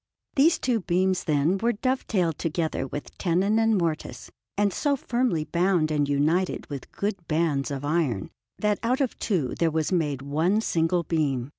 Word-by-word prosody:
These 315 +5 +5
two 245 -3 0
beams, 185 0 0
then, 155 +4 +2
were 235 +3 +1
dove 255 +5 -1
tailed 175 -7 0
together 160 -4 -1
with 145 +3 -7
tenon 195 +5 +2
and 225 -1 +3
mortise, 160 -8 -3 0.3
and 205 -1 +2
so 285 -1 +1
firmly 240 - 0
bound 170 0 +1
and 145 -2 +1
united 155 +6 +1
with 140 -2 -7
good 200 -4 -3
bands 155 -3 0
of 140 0 -4
iron, 145 - 0 0.3
that 210 -1 0
out 245 +3 +1
of 270 -4 -1
two 170 - 0
there 165 - +3
was 160 +1 -1
made 150 -7 0
one 160 +9 +1
single 170 -4 +1
beam. 145 -6 -1
170 Hz, 170 wpm, -26 LUFS, 150-205 Hz, 0.3 s, These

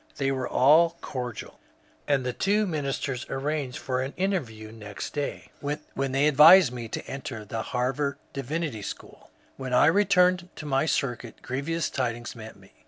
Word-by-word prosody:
They 135 -1 0
were 130 -2 -2
all 165 +5 +5
cordial, 125 -4 -6 0.5
and 140 -3 +1
the 125 - -1
two 205 - +1
ministers 140 -6 -2
arranged 135 -1 -2
for 130 -1 -2
an 135 +2 -4
interview 125 - -2
next 105 -3 -7
day, 145 -1 -4
when 145 -2 -3
they 135 +3 +3
advised 150 0 +8
me 120 -2 -5
to - - -5
enter 125 -5 -6
the 110 +2 -4
Harvard 130 +4 -1 0.2
Divinity 140 -3 -3
SchooL - - -9 0.3
When 130 -2 -2
I - - +6
returned 180 -1 +3
to 155 - -8
my 135 +1 +1
circuit 125 -5 -2
grievous 150 +6 -2
tidings 120 -2 -3
met 110 -1 -10
me. - - -20
135 Hz, 160 wpm, -26 LUFS, 125-155 Hz, 0.5 s, advised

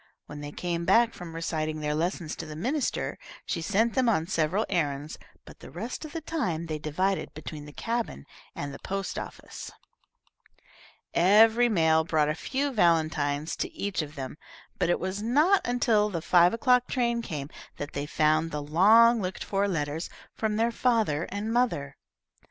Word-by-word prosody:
When 150 0 -9
they 145 0 -6
came 170 +1 -3
back 230 +5 +4
from 170 -2 -9
reciting 155 -2 -2
their 150 0 -1
lessons 165 0 -2
to 160 - -6
the 155 - -7
minister, 255 - -2 0.3
she 170 - -2
sent 215 +7 +1
them 255 -3 +2
on 165 -8 +1
several 175 +4 0
errands, 150 -4 -2 0.3
but - - -14
the - - -11
rest 230 - -6
of 305 - -9
the 330 - -5
time 185 - -2
they 155 -2 -4
divided 185 +6 -1
between 155 -1 -7
the 150 - -10
cabin 230 - -3 0.3
and 140 -1 -5
the - - -9
post 195 -1 -3
office. - - -8 1.4
Every 220 +6 +5
mail 160 -5 +3
brought 155 -2 +1
a - - +1
few 275 - -2
valentines 155 - +1
to - - -3
each 200 -4 -2
of 150 0 -8
them, 135 +1 -6 0.4
but 180 -2 +1
it 175 - +2
was 190 +3 -3
not 300 - +3
until 225 -4 +2
the 170 -5 -4
five 175 0 +5
o'clock 250 +1 +3
train 235 -2 0
came 150 -9 -5 0.3
that 145 0 -6
they 145 +1 -3
found 155 +2 +2
the 150 -2 -4
long 220 +9 +5
looked 185 0 -4
for 200 0 0
letters 160 -2 -2 0.2
from 215 -1 -1
their 230 +2 +2
father 225 - +1
and 210 +3 -3
mother. 190 - 0
175 Hz, 175 wpm, -27 LUFS, 155-225 Hz, 1.4 s, Every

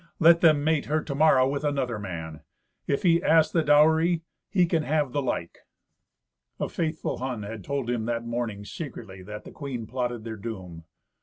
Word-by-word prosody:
"Let 170 0 +6
them 155 -4 +5
mate 155 -1 +1
her 155 +1 0
to 140 - -4
morrow 140 -3 +5
with 140 +2 -2
another 135 -6 -1
man; 80 -6 -6 0.5
if 140 - 0
he 170 -2 +4
ask 160 -1 +4
the 165 - +2
dowry, 160 +3 +4 0.3
he 180 -3 +3
can 165 -2 +1
have 150 -3 0
the 145 - 0
like." 85 -10 -3 1.0
A - - -2
faithful 160 -1 -2
Hun 125 -4 -3
had 105 0 -7
told 140 -3 -3
him 120 -2 -1
that 115 0 -2
morning, 115 -4 -3
secretly, 115 - -8
that 105 +3 -8
the - - -11
queen 130 -6 -5
plotted 120 -1 -3
their 110 -1 -6
doom. 95 -7 -7
130 Hz, 180 wpm, -26 LUFS, 110-155 Hz, 1.0 s, Let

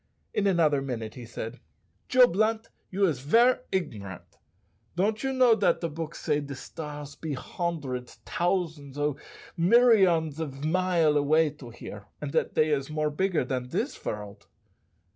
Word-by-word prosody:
In 200 - +1
another 160 -7 +3
minute 115 -5 -4
he 125 - -9
said, 115 +1 -6 0.5
"Joe 255 -1 +7
Blunt, 220 +2 0 0.2
you 195 +1 +2
is 155 -9 0
ver' 230 - +4
igrant. 105 - -5 0.6
Don't 210 +5 +1
you 270 - -1
know 255 -3 +5
dat - - +2
de 170 - -1
books 160 +1 -6
say 150 -2 +1
de 140 -1 -6
stars 150 0 -8
be 155 +1 -5
hondreds, 135 -5 -4
tousands 165 -6 -1
oh! 145 -1 0 0.4
milleryons 180 - +4
of 145 -2 -5
mile 170 -2 +2
away 155 +2 +3
to 140 -4 -12
here, 105 -3 -10
and 145 -2 -4
dat - - 0
dey 155 0 +3
is 140 -1 0
more 155 0 -1
bigger 175 -2 0
dan 125 -1 -3
dis - - -2
vorld?" 105 -1 -7
155 Hz, 155 wpm, -27 LUFS, 135-185 Hz, 0.6 s, Joe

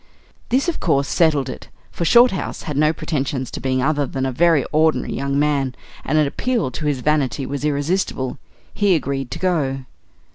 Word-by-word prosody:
This, 265 +7 +2
of 345 - -1
course, 140 -5 +1
settled 150 -5 +2
it, - - -8 0.2
for 170 - -3
Shorthouse 235 0 +3
had 150 - -4
no 150 +2 +3
pretensions 135 -5 -3
to - - -5
being 130 -1 0
other 145 -1 +1
than 135 0 -3
a 135 - -1
very 160 0 +3
ordinary 155 +1 +2
young 140 +1 -1
man, 140 -3 +1 0.3
and 155 - 0
an 155 - +4
appeal 225 - -1
to 150 +4 -4
his 140 -4 -1
vanity 140 -3 0
was 140 0 -4
irresistible. 145 -2 -1 0.3
He 200 -3 +3
agreed 135 -3 -2
to - - -5
go. 140 -8 -1
145 Hz, 180 wpm, -20 LUFS, 135-160 Hz, 0.3 s, an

